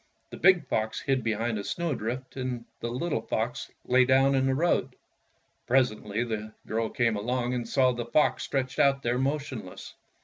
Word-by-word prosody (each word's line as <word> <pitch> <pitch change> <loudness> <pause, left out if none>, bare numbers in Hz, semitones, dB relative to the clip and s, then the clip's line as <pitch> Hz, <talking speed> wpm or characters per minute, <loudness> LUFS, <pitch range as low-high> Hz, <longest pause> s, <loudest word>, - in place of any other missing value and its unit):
The - - -7
big 180 -3 +5
fox 110 -2 -1
hid 135 -3 0
behind 115 0 -1
a - - -4
snow 170 - -2
drift, 125 +3 -5
and 125 -3 -4
the 120 - -3
little 130 +1 -2
fox 120 +4 -3 0.2
lay 130 +1 +5
down 135 +2 +4
in 135 0 +2
the 135 - +2
road. 170 +5 +1 0.7
Presently 115 -4 +1
the 110 -2 -4
girl 110 0 -1
came 115 -3 +1
along 120 +4 -1
and 120 -2 -3
saw 130 -2 +3
the 120 -1 -4
fox 150 +6 +2
stretched 130 -1 -2
out 140 -1 +3
there 120 +1 0
motionless. 135 -8 -4
125 Hz, 175 wpm, -28 LUFS, 115-135 Hz, 0.7 s, big